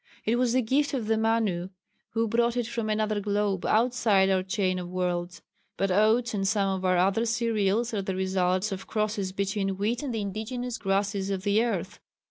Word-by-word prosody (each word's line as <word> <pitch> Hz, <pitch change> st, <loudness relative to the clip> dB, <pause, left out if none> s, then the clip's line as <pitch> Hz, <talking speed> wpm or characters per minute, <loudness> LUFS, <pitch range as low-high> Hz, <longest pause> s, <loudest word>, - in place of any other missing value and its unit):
It 230 Hz, +2 st, +2 dB
was 245 Hz, -1 st, +2 dB
the 255 Hz, 0 st, +2 dB
gift 280 Hz, +5 st, +1 dB
of 240 Hz, -5 st, -2 dB
the 220 Hz, +1 st, +2 dB
Manu 220 Hz, -5 st, 0 dB, 0.4 s
who 225 Hz, 0 st, +1 dB
brought 235 Hz, +2 st, +1 dB
it 240 Hz, -, 0 dB
from 230 Hz, -1 st, -3 dB
another 215 Hz, -1 st, 0 dB
globe 205 Hz, -2 st, -1 dB
outside 220 Hz, -4 st, +3 dB
our 190 Hz, -1 st, +2 dB
chain 185 Hz, -1 st, -1 dB
of 175 Hz, -1 st, -6 dB
worlds. 180 Hz, -1 st, -3 dB, 0.3 s
But 195 Hz, -1 st, 0 dB
oats 220 Hz, +5 st, +3 dB
and 195 Hz, -2 st, 0 dB
some 195 Hz, -2 st, +1 dB
of 190 Hz, -, -5 dB
our 185 Hz, -1 st, +3 dB
other 195 Hz, +5 st, +2 dB
cereals 230 Hz, -1 st, 0 dB
are 205 Hz, -, 0 dB
the 190 Hz, -1 st, -3 dB
results 185 Hz, +1 st, 0 dB
of 190 Hz, 0 st, -6 dB
crosses 210 Hz, -3 st, -1 dB
between 195 Hz, 0 st, -2 dB
wheat 220 Hz, +5 st, -1 dB
and 285 Hz, -3 st, -3 dB
the 225 Hz, -2 st, -2 dB
indigenous 225 Hz, +5 st, -4 dB
grasses 195 Hz, 0 st, 0 dB
of 190 Hz, -1 st, -2 dB
the 205 Hz, +3 st, +3 dB
earth. 200 Hz, -5 st, -3 dB
205 Hz, 195 wpm, -27 LUFS, 190-230 Hz, 0.4 s, outside